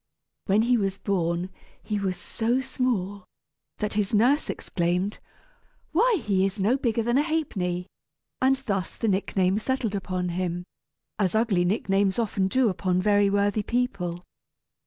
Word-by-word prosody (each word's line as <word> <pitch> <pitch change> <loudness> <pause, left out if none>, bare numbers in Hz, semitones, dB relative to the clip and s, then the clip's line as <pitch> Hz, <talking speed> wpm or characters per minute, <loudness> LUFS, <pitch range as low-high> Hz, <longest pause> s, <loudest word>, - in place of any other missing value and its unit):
When 205 +3 +4
he 245 +1 +3
was 195 -2 -1
born 175 -2 -1 0.3
he 210 -1 -2
was 190 -2 -1
so 235 +3 -1
small 235 -7 -2 0.5
that 210 0 -2
his 210 +1 0
nurse 255 +8 +3
exclaimed, 180 +3 -1 0.7
"Why, 430 +4 +3
he 195 -3 +2
is 195 +2 -1
no 210 +6 +3
bigger 235 -4 0
than 240 +4 +2
a - - +5
ha'penny!" 200 - -1 0.6
and 265 +1 +4
thus 195 -4 -2
the 225 - -1
nickname 190 0 +1
settled 250 -2 -1
upon 185 -2 -2
him, 175 0 -2 0.6
as 195 -1 +1
ugly 215 -6 +2
nicknames 195 0 +1
often 205 -4 0
do 255 +5 +2
upon 185 -2 0
very 205 +1 +3
worthy 205 +1 +1
people. 195 -7 -2
200 Hz, 145 wpm, -26 LUFS, 185-235 Hz, 0.7 s, a